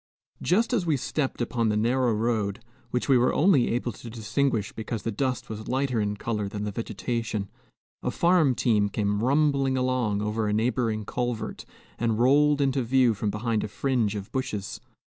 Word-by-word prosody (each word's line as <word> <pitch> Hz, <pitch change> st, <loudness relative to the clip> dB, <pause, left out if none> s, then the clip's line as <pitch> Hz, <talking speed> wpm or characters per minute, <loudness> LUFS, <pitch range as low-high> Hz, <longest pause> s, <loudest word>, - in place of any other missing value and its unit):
Just 225 Hz, +7 st, +2 dB
as 220 Hz, -7 st, +2 dB
we 160 Hz, -4 st, +1 dB
stepped 135 Hz, 0 st, -2 dB
upon 115 Hz, -1 st, 0 dB
the 105 Hz, -, +1 dB
narrow 120 Hz, +3 st, +2 dB
road 110 Hz, -2 st, 0 dB, 0.3 s
which 125 Hz, -, -1 dB
we 135 Hz, -3 st, +5 dB
were 125 Hz, -, +2 dB
only 150 Hz, -6 st, +4 dB
able 120 Hz, +1 st, -1 dB
to 115 Hz, +2 st, -10 dB
distinguish 115 Hz, 0 st, -1 dB
because 110 Hz, 0 st, -5 dB
the 115 Hz, -, -1 dB
dust 130 Hz, +3 st, -2 dB
was 110 Hz, 0 st, -7 dB
lighter 130 Hz, -3 st, 0 dB
in 105 Hz, 0 st, -2 dB
color 105 Hz, -2 st, -2 dB
than 105 Hz, +1 st, -5 dB
the 105 Hz, -, -2 dB
vegetation 110 Hz, -1 st, -3 dB, 0.5 s
a -, -, -1 dB
farm 170 Hz, -7 st, +3 dB
team 105 Hz, -5 st, +2 dB
came 100 Hz, 0 st, -1 dB
rumbling 140 Hz, -1 st, +2 dB
along 125 Hz, -5 st, 0 dB
over 105 Hz, +1 st, -1 dB
a 105 Hz, -, 0 dB
neighboring 110 Hz, -1 st, 0 dB
culvert, 120 Hz, -1 st, -3 dB, 0.3 s
and 115 Hz, -2 st, +1 dB
rolled 145 Hz, +4 st, +4 dB
into 135 Hz, -1 st, +1 dB
view 125 Hz, 0 st, +3 dB
from 105 Hz, +1 st, -2 dB
behind 110 Hz, +1 st, -1 dB
a -, -, -2 dB
fringe 115 Hz, -2 st, 0 dB
of 100 Hz, -1 st, -6 dB
bushes. 105 Hz, -7 st, -4 dB
120 Hz, 180 wpm, -26 LUFS, 105-130 Hz, 0.5 s, we